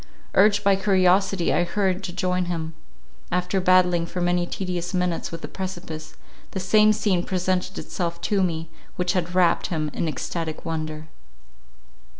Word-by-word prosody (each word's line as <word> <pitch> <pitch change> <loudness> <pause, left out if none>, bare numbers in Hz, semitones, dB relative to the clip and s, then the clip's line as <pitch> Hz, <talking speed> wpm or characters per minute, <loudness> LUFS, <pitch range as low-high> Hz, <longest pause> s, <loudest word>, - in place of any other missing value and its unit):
Urged 205 +1 +4
by 200 -1 +5
curiosity, 190 -1 +3
I - - +3
hurried 190 +1 0
to 180 - -4
join 180 0 0
him. 165 -2 -3 0.6
After 180 +2 0
battling 180 -2 +4
for 180 - -5
many 175 0 +1
tedious 180 -1 -3
minutes 180 -2 -1
with 165 -1 -6
the - - -5
precipice, 165 -4 -6 0.4
the 190 - -2
same 215 +3 +5
scene 195 -4 +1
presented 185 0 -1
itself 170 -2 -3
to 200 -2 +1
me, 165 -3 -1 0.2
which 180 0 0
had 180 -1 -2
wrapt 180 -2 +3
him 155 -3 -2
in 170 - -1
extatic 160 0 -4
wonder. 155 -1 -4
180 Hz, 150 wpm, -24 LUFS, 170-190 Hz, 0.6 s, by